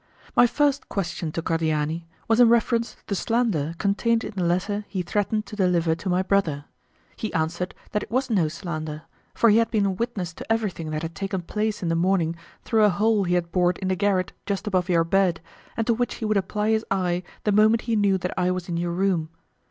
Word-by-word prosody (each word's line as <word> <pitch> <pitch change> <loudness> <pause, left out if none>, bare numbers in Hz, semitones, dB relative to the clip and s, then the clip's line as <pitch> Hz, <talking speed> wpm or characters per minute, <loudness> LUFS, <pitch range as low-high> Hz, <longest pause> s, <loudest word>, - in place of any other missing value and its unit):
My 245 - +7
first 285 +3 +1
question 175 -4 -3
to 165 - -3
Cordiani 160 0 -1 0.2
was 225 +1 +3
in 240 -2 +7
reference 235 0 +2
to - - -30
the - - -3
slander 195 -7 0
contained 225 +4 +1
in 215 - -6
the 185 - -1
letter 185 +4 0
he 185 -3 -3
threatened 210 +3 -1
to - - -9
deliver 175 -4 +2
to 170 +4 -4
my 180 +1 +2
brother: 170 -8 0 0.5
he 220 - -4
answered 170 +3 -1 0.2
that 210 - 0
it - - -8
was 255 +4 0
no 190 -9 +2
slander, 155 -2 -5 0.3
for 230 - +5
he 210 - +5
had 230 0 +3
been 210 -3 +1
a 195 - +1
witness 190 -4 -3
to 225 - -7
everything 205 -8 -1
that 155 +1 -3
had 165 0 -4
taken 195 -1 -3
place 210 +3 -2
in 170 - 0
the 165 - +1
morning 170 -1 +1 0.3
through 220 -2 +2
a 210 - +6
hole 210 +1 +2
he 175 0 +1
had 170 -1 -1
bored 180 -1 +2
in 190 - -3
the 185 - +1
garret 190 -1 0
just 200 0 -2
above 185 -3 0
your 170 -2 +4
bed, 180 0 +2 0.4
and 225 - 0
to 235 - +3
which 245 +1 -1
he 225 - -5
would 215 0 +1
apply 210 +2 0
his 220 0 +2
eye 180 -2 0 0.2
the 210 - +2
moment 215 +2 +4
he 230 -1 0
knew 200 -2 +3
that 180 -1 -3
I 180 -1 +1
was 185 -1 -2
in 170 -2 -2
your 170 0 -1
room. 180 -3 0
190 Hz, 230 wpm, -24 LUFS, 170-215 Hz, 0.5 s, My